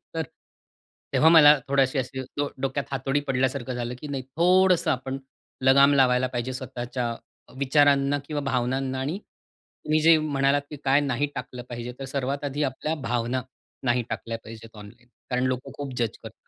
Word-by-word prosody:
तर, - - 0 0.9
तेव्हा 160 - +5
मला 150 -3 +8
थोडीशी 135 0 +2
अशी 130 +1 -4 0.2
डो 145 0 0
डोक्यात 135 +1 -1
हातोडी 135 +1 0
पडल्यासारखं 130 -1 -1
झालं, 120 0 -3
की 150 - -7
नाही 135 -2 -4
थोडंसं 180 -1 +4
आपण 130 0 -3 0.5
लगाम 140 +2 +6
लावायला 130 -2 +3
पाहिजे 125 0 -3
स्वतःच्या 125 -2 -4 0.4
विचारांना 140 0 +3
किंवा 145 0 -3
भावनांना 130 0 -1
आणि 145 +7 -2
तुम्ही 155 -6 -5
जे 165 +1 +6
म्हणालात, 145 -2 +1
कि 150 - -7
काय 135 +1 +4
नाही 140 0 0
टाकलं 125 0 -6
पाहिजे. 120 0 -5
तर 135 - -5
सर्वात 135 +1 -3
आधी 145 +1 -2
आपल्या 145 +4 -2
भावना, 120 +1 -1 0.4
नाही 125 -1 +2
टाकल्या 115 +1 -4
पाहिजेत 115 0 -11
ऑनलाईन. 115 +4 -13 0.2
कारण 125 -1 0
लोकं 130 0 -3
खूप 140 -2 -5
जज 115 -2 -1
करतात. 110 -1 -13
135 Hz, 160 wpm, -25 LUFS, 125-145 Hz, 0.9 s, मला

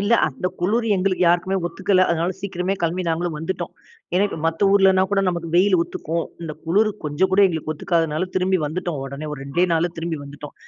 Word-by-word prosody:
இல்ல 205 +3 +1
அந்த 150 +5 -3
குளுரு 225 +6 +1
எங்களுக்கு 185 0 0
யாருக்குமே 175 +3 +2
ஒத்துக்கல. 185 +2 +2
அதனால 170 +2 0
சீக்கிரமே 190 -1 -2
கெளம்பி 170 +2 0
நாங்களும் 165 -1 -1
வந்துட்டோம். 165 +4 -4 0.4
ஏன்னா, 195 +3 +4
இப்ப 195 - -6
மத்த 165 +3 -1
ஊர்லனா 190 -1 +5
கூட 200 -1 +2
நமக்கு 170 -2 -3
வெயிலு 185 0 +4
ஒத்துக்கும். 165 0 -3 0.2
இந்த 160 -2 -4
குளுரு 210 +6 +3
கொஞ்சம் 150 +6 +1
கூட 195 - +5
எங்களுக்கு 160 -3 -2
ஒத்துக்காததுனால 165 +1 0
திரும்பி 185 0 +2
வந்துட்டோம் 160 -1 -3
ஒடனே. 140 +3 -6
ஒரு 145 - -6
2டே 165 +6 +1
நாள்ல 165 +2 +1
திரும்பி 165 -2 -3
வந்துட்டோம். 145 +1 -10
175 Hz, 185 wpm, -22 LUFS, 160-190 Hz, 0.4 s, ஊர்லனா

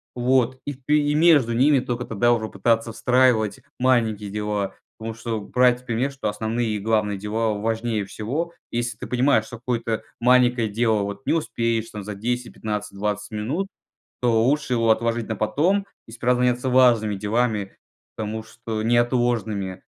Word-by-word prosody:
вот. 130 +1 +2
И 145 - -3
ты 140 +3 +1
и 145 0 +1
между 150 -6 +5
ними 135 +4 +4
тока 125 -1 -3
тогда 120 +2 +2
уже 110 -2 -1
пытаться 115 +3 0
встраивать 125 -3 +2 0.2
маленькие 115 -5 +1
дела. 105 -1 -2 0.2
Потому 110 0 -5
что 115 0 -4
брать 125 +3 +2
пример, 125 +3 0
что 135 - -4
основные 110 +3 -2
и 105 -1 -1
главные 105 -1 0
дела 110 +2 -1
важнее 110 +1 -1
всего. 145 - -4 0.2
Если 120 -1 -2
ты - - -7
понимаешь, 125 -3 +2
что 120 - -9
какое-то 115 -2 -2 0.2
маленькое 125 -2 +4
дело 110 0 +1
вот 100 +7 -6
не - - +3
успеешь, 115 -8 -1
там, 105 -2 -7
за 105 - -5
10-15-20 105 -3 -3
минут, 135 - -2 0.5
то 115 -2 +3
лучше 140 +1 +1
его 115 -1 +2
отложить 115 0 +1
на 110 - -2
потом 170 - +1 0.2
и - - -13
справляться 125 +1 +1
важными 120 -4 +4
делами, 105 0 -1 0.4
потому 110 0 -4
что 110 -1 -5
неотложными. 115 -5 0
115 Hz, 155 wpm, -23 LUFS, 110-125 Hz, 0.5 s, между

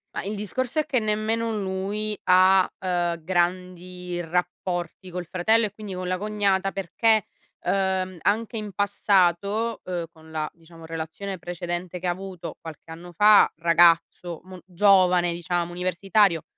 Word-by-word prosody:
Ma, - - -3
il 205 +2 -4
discorso 255 +7 -2
è 305 - +1
che 255 - +1
nemmeno 220 +1 -1
lui 200 +2 -3
ha, 185 +1 +5
uhm, 175 -2 -1
grandi 180 0 -2
rapporti 180 +1 -3
col 180 0 -5
fratello 215 +7 +2
e 205 - -6
quindi 210 -2 -8
con 185 0 -4
la 185 0 0
cognata. 200 -1 0
Perché, 210 +3 +1 0.4
uhm, 190 -1 0
anche 225 +5 0
in 210 -2 -4
passato, 200 +2 +1
uhm, 175 -2 -3
con 160 0 -17
la, 155 -1 -2
diciamo, 165 0 -15
relazione 165 +5 -5
precedente 175 +1 -5
che 180 - -3
ha - - +2
avuto 185 -1 -7
qualche 160 0 -10
anno 170 +2 -10
fa, 210 +4 +6
ragazzo 170 0 +3
mo 185 -1 -11
giovane, 180 -2 +4
diciamo 175 0 -2
universitario, 180 0 +1
185 Hz, 145 wpm, -25 LUFS, 175-200 Hz, 0.4 s, fa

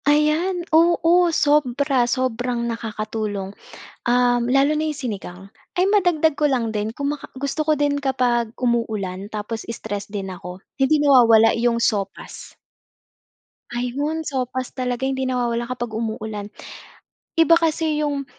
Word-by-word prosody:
Ayan, 315 +5 +2
oo. 340 +1 +4
Sobra, 285 -4 +2
sobrang 245 -1 -1
nakakatulong, 215 -3 -4 0.5
um, 245 0 +3
lalo 275 +4 +3
na 310 - 0
yung 305 - -2
sinigang. 205 -9 -6 0.3
Ay 370 +2 +2
madagdag 345 -7 +2
ko 300 - +3
lang 250 -5 0
din 215 +1 -3
kuma 285 +2 -2 0.2
gusto 280 +3 -3
ko 310 - +4
din 290 -1 0
kapag 245 -4 0
umuulan 215 -6 -2
tapos 215 +1 -5
stress 205 -3 -5
din 200 -2 -5
ako, 180 0 -9 0.2
hindi 290 +3 +3
nawawala 230 -6 +6
iyong 235 0 +1
sopas. 200 -4 -3 1.2
Ayun, 285 +7 -2
sopas 255 -2 -3
talaga 250 0 -2
hindi 265 -1 -1
nawawala 240 -1 -1
kapag 240 -3 -4
umuulan. 220 -2 -4 0.9
Iba 330 0 +6
kasi 320 -2 0
yung 285 -2 -2
250 Hz, 125 wpm, -22 LUFS, 225-295 Hz, 1.2 s, nawawala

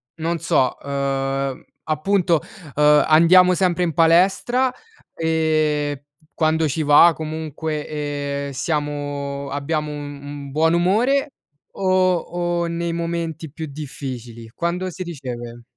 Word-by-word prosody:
non 165 +1 -2
so, 160 -6 +1
uhm, 135 -1 -2 0.2
appunto, 170 +1 +1 0.3
uhm, 150 0 +5
andiamo 180 +3 +6
sempre 180 -1 +1
in 165 -2 -1
palestra, 190 - +3 0.4
e 155 -3 0 0.3
quando 160 0 +1
ci 155 +2 -1
va 150 +3 +7
comunque, 155 -1 -4 0.6
ehm, - - -6
siamo 145 -1 -3
abbiamo 150 +2 -2
un 145 -1 -7
un 145 -1 -8
buon 160 +3 +2
umore, 240 - +2 0.5
o 185 -1 +3
o 175 0 -2
nei 170 0 -2
momenti 165 -2 -3
più 160 +2 -6
difficili? 130 -5 -7
Quando 175 +2 -2
si 185 +1 -6
riceve? 120 -7 -7
155 Hz, 115 wpm, -21 LUFS, 145-170 Hz, 0.6 s, va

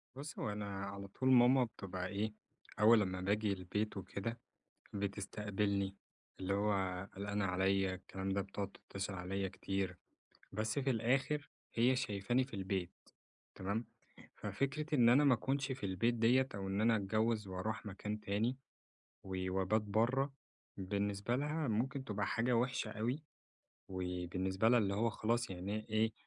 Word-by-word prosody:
بُص، 145 +3 -7
هو 105 - -1
أنا 105 0 -3 0.2
على 100 0 -6
طول 130 +7 0
ماما 125 +1 +7
بتبقى 95 -5 -4
إيه، 105 +2 -2 0.5
أول 110 +1 +8
لما 95 -2 -1
باجي 105 +1 +1
البيت 100 +3 -2
وكده، 100 +4 -4 0.5
بتستقبلني. 100 -1 -1 0.4
اللي 95 +1 0
هو 105 +1 +2 0.4
قلقانة 100 +1 -1
عليّا 95 0 +2
الكلام 95 +1 -5
ده، 100 +1 +1
بتقعد 100 0 -5
تتصل 100 0 -3
عليّا 95 +1 -2
كتير، 95 -1 -2 0.6
بس 110 +5 -1
في 135 -1 +1
الآخر 135 +5 +1 0.2
هي 125 +3 +4
شايفاني 120 0 +1
في 130 - -11
البيت، 95 -2 -2 0.6
تمام. 100 +5 -2 0.5
ففكرة 150 +3 -2
إن 120 -4 +6
أنا 140 +5 +7
ما 135 -3 +7
أكنش 135 +3 0
في 115 -6 -3
البيت 95 +6 +1
ديّة 125 +3 +4
أو 95 -1 -3
إن 100 +2 0
أنا 115 0 +5
أتجوز 110 +2 +1
وأروح 105 +4 -3
مكان 105 +2 -4
تاني 110 +6 0 0.7
و 95 -1 -3
وأبات 95 +3 +2
برّه، 120 +7 +2 0.4
بالنسبة 100 +4 -1
لها 150 0 -1
ممكن 130 +5 0
تبقى 105 -3 -1
حاجة 120 +1 +2
وحشة 125 -2 0
أوي، 120 +7 -2 0.7
وبالنسبة 95 +2 0
لها 120 - +6
اللي 100 -3 +1
هو 115 +3 +2
خلاص 120 +2 0
يعني 100 +4 -4
إيه، 110 0 +2
105 Hz, 145 wpm, -36 LUFS, 95-120 Hz, 0.7 s, أول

